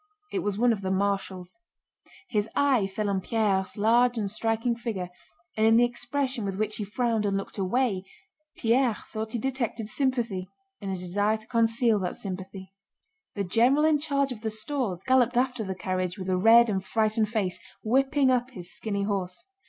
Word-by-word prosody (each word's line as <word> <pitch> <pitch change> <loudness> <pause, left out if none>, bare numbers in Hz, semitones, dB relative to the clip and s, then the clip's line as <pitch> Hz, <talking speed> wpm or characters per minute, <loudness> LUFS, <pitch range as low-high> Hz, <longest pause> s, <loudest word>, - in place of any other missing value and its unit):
It 390 - -1
was 205 - -2
one 240 +1 +4
of 205 - -5
the 190 - -2
marshals. 190 0 -2 0.7
His 210 - -1
eye 265 -8 +3
fell 205 +2 -3
on 195 -1 0
Pierre's 195 -2 0
large 240 +3 +3
and 205 -3 -1
striking 225 +2 0
figure, 215 -7 -4 0.4
and 220 0 +3
in 225 0 +6
the 240 - +6
expression 255 0 -2
with 195 -1 -3
which 215 0 -1
he 210 - -3
frowned 225 +1 0
and 200 -1 0
looked 195 +1 -6
away 195 0 0 0.5
Pierre 240 0 +2
thought 220 +1 -6
he - - 0
detected 235 -3 -2
sympathy 230 -6 -1 0.3
and 200 - -4
a 190 - -2
desire 205 +5 0
to 215 - -11
conceal 230 -1 +2
that 180 -2 -3
sympathy. 190 0 -7 0.6
The 200 - -1
general 240 +10 +3
in 310 -2 +4
charge 280 -2 0
of 225 -4 -7
the 220 - -2
stores 215 -4 -3
galloped 255 -2 +3
after 250 -2 +1
the 190 -2 -4
carriage 185 0 -2
with 190 -1 -5
a 185 - +2
red 225 +5 +6
and 195 -3 -1
frightened 215 +1 +1
face, 205 -5 -1 0.2
whipping 270 +3 +3
up 250 0 +1
his 180 -8 -7
skinny 200 -2 -3
horse. 190 -3 -3
220 Hz, 185 wpm, -27 LUFS, 195-240 Hz, 0.7 s, in